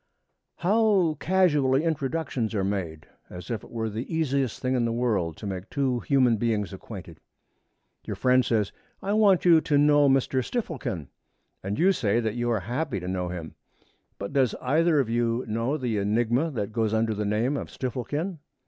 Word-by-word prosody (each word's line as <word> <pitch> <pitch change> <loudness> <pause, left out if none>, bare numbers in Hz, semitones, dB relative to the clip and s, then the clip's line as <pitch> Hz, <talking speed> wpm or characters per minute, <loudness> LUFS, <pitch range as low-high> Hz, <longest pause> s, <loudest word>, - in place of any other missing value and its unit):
How 195 -4 +2
casually 150 -7 +3
introductions 140 -7 -2
are 100 - 0
made, 90 -6 -3 0.2
as 90 +3 -8
if 110 -4 -3
it - - -13
were 115 -1 -3
the 110 +7 -5
easiest 140 -6 0
thing 130 0 -1
in 125 -2 +1
the 115 - 0
world 110 -9 0
to - - -8
make 95 0 -5
two 130 -3 0
human 125 -4 +3
beings 105 -4 -1
acquainted! - - -9 0.9
Your - - -4
friend 130 0 +3
says, 110 -4 0 0.3
'I 200 - 0
want 205 -5 +4
you 165 -2 +7
to 145 -2 +1
know 145 -1 +5
Mr. 135 -1 +2
Stifflekin,' 130 - -4 0.5
and 100 +2 -3
you 185 +4 +4
say 115 - +1
that 110 -2 -1
you 120 0 -1
are 110 -4 +1
happy 125 - -2
to 90 - -7
know 90 -1 -2
him. 85 -3 -6 0.6
But 100 +4 -6
does 130 -4 +2
either 155 +4 +2
of 135 - +1
you 115 +1 0
know 115 +7 -1
the 120 -6 -1
enigma 120 +9 +1
that 110 -8 -3
goes 110 -1 0
under 110 0 +1
the 105 0 -2
name 110 +7 0
of - - -4
Stifflekin? 145 +7 -4
120 Hz, 180 wpm, -26 LUFS, 105-145 Hz, 0.9 s, you